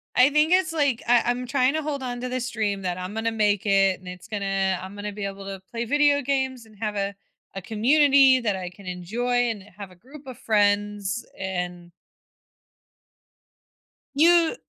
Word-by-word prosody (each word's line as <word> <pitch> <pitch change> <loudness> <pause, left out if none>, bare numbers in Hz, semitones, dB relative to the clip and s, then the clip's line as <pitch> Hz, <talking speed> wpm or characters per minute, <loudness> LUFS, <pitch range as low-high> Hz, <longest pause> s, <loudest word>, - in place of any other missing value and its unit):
I 255 +2 +6
think 300 +2 +2
it's 365 -3 +3
like, 285 -6 +1
I 240 -1 +4
I'm 245 +1 -1
trying 260 0 +2
to 315 - -1
hold 290 -3 -4
on 245 -1 -4
to 255 - -4
this 250 0 -3
dream 205 -4 -2
that 180 -1 -3
I'm 185 +2 -6
gonna 225 +1 -1
make 210 -2 +1
it 195 -2 +3
and 185 - -15
it's 180 0 -9
gonna 195 -2 -1
I'm 190 +2 -9
gonna 205 0 -5
be 205 0 -5
able 195 0 -7
to 195 -1 -7
play 235 0 -3
video 290 +3 +3
games 265 -3 -2
and 220 -1 -19
have 215 -2 -3
a 200 0 -2 0.4
a 195 - -5
community 270 +5 +4
that 210 -4 0
I 180 -1 -5
can 190 +2 -16
enjoy 235 +8 -1
and 210 -4 -5
have 200 -3 -9
a - - -16
group 270 - -15
of 255 - -8
friends 205 0 0
and 180 -2 -5 2.2
you 335 +6 +4
220 Hz, 190 wpm, -24 LUFS, 195-260 Hz, 2.2 s, I